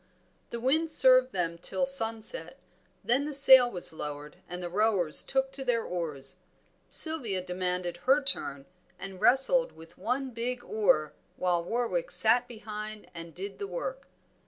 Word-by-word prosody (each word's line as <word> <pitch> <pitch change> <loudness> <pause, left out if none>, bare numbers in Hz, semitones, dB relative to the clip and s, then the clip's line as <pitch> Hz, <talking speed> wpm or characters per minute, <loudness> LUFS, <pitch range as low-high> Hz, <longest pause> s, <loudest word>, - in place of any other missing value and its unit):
The 235 - -6
wind 305 +7 +2
served 255 -3 +4
them 170 -2 -3
till 270 +9 -1
sunset, 225 - -2 0.5
then 260 +4 +1
the 300 -1 -3
sail 265 -3 +8
was 180 -7 +1
lowered 150 -1 -8
and 180 0 -7
the - - -4
rowers 185 -4 +2
took 270 0 -1
to 270 0 -7
their 240 -3 0
oars. 150 -6 -5 0.5
Sylvia 265 - +3
demanded 180 -1 -4
her 270 +3 +4
turn, 140 - -2 0.3
and 195 -1 -8
wrestled 450 - +3
with 165 0 -16
one 255 +6 -3
big 245 +1 -5
oar 155 -8 0 0.2
while 175 -2 -1
Warwick 245 - -2
sat 245 0 +3
behind 215 -2 -9
and 165 -1 -10
did 195 +2 -8
the 405 - -5
work. - - -6
225 Hz, 150 wpm, -28 LUFS, 180-265 Hz, 0.5 s, sail